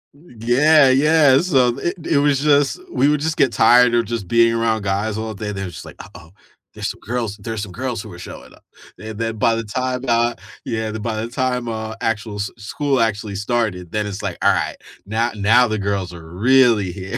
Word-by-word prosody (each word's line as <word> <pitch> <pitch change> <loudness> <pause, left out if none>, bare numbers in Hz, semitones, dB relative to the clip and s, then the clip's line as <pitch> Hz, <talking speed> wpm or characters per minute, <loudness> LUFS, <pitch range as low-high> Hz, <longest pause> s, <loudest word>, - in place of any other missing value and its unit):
Yeah, 140 +1 +3
yeah, 145 -1 +4
so 130 -9 +2
it 175 +3 -2
it 155 - +1
was 145 -2 +2
just, 145 - +2
we 140 - +2
would 150 0 +2
just 160 +1 -2
get 135 -4 +2
tired 125 0 +5
of 115 -1 +2
just 110 -5 -4
being 115 +1 +3
around 115 -2 0
guys 100 +2 -1
all 110 0 -4
day, 105 +1 -5
they're 95 -1 -5
just 90 - -9
like, - - -11
"Uh-oh, 85 -1 -15 0.5
there's - - -3
some - - -14
girls 115 -3 -3
there's 110 +1 -5
some 95 - -8
girls 125 0 -4
who 110 - -11
are 85 - -11
showing - - -11
up." - - -21 0.4
And 110 0 -8
then 115 -1 -3
by 115 +2 +2
the 115 - -3
time, 125 +4 -3
uh, 120 0 +2 0.3
yeah, 110 -2 -3
the 110 - -5
by 110 0 -3
the 115 +1 -4
time 125 -1 -2
uh 110 0 -5
actual 110 -1 -2
s 100 -1 -4
school 135 +6 -1
actually 105 -2 -1
started, 100 -4 -2
then 105 -1 -1
it's 100 0 -6
like, 100 -4 -4
"All - - +5
right, - - -2 0.3
now 115 +3 0
now 115 +4 +4
the 110 -1 -2
girls 100 -3 -2
are 80 -2 -11
really 115 -2 +3
here," 95 +1 -6
115 Hz, 215 wpm, -20 LUFS, 105-125 Hz, 0.5 s, tired